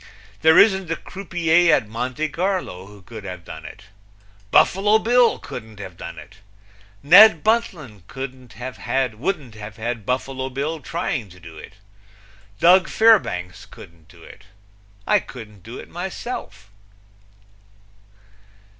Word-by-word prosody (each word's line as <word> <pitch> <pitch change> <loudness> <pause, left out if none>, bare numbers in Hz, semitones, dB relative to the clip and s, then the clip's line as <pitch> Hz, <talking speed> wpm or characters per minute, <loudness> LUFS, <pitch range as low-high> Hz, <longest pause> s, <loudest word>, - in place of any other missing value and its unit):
There 160 +1 +5
isn't 190 -4 +4
a 165 - 0
croupier 175 -3 +1
at 110 - -2
Monte 125 +7 -3
Carlo 175 - -3
who 100 -2 -15
could 110 +1 -10
have 90 -2 -8
done 80 -2 -10
it. 75 - -11 0.7
Buffalo 205 - +4
Bill 240 +2 +3
couldn't 110 -3 -10
have 95 -3 -9
done - - -9
it. - - -13 0.7
Ned 180 +1 +8
Buntline 170 - -1
wouldn't 130 -3 -8
have 120 - -4
had 115 -1 -4
Buffalo 130 +1 -2
Bill 145 +5 -3
trying 140 - -3
to 90 +1 -16
do 85 -2 -13
it. 80 - -12 0.9
Doug 180 +2 +5
Fairbanks 205 - +2
couldn't 85 -1 -16
do 85 -3 -18
it. 105 - -15 0.6
I - - +3
couldn't 105 -6 -12
do 115 +6 -10
it - - -10
myself. 175 - -7
130 Hz, 125 wpm, -21 LUFS, -, 0.9 s, Ned